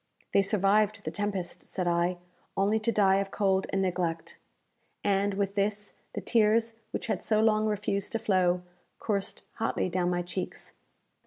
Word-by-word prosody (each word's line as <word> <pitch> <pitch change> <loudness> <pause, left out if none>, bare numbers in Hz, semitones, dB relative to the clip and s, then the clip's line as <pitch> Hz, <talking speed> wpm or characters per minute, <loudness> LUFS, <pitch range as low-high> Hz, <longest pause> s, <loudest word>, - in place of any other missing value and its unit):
"They 200 - +6
survived 205 +1 +2
the - - -2
tempest," 200 -4 -3
said 185 -2 -3
I, 175 +1 +1 0.4
"only 205 +3 +3
to 220 +2 +1
die 195 -3 +4
of 195 0 -1
cold 195 -1 +1
and 195 0 0
neglect!" 175 -3 -2 0.6
And, 200 0 +2
with 200 -1 -1
this, 205 0 -1 0.2
the - - -3
tears 225 0 +3 0.2
which - - -4
had 225 - -1
so 215 -1 +2
long 215 0 +3
refused 205 -1 -1
to - - +2
flow, 185 -5 +2 0.3
coursed 200 -2 -2
hotly - - 0
down 180 0 0
my 175 0 0
cheeks. 180 +1 -5
200 Hz, 160 wpm, -29 LUFS, 185-210 Hz, 0.6 s, They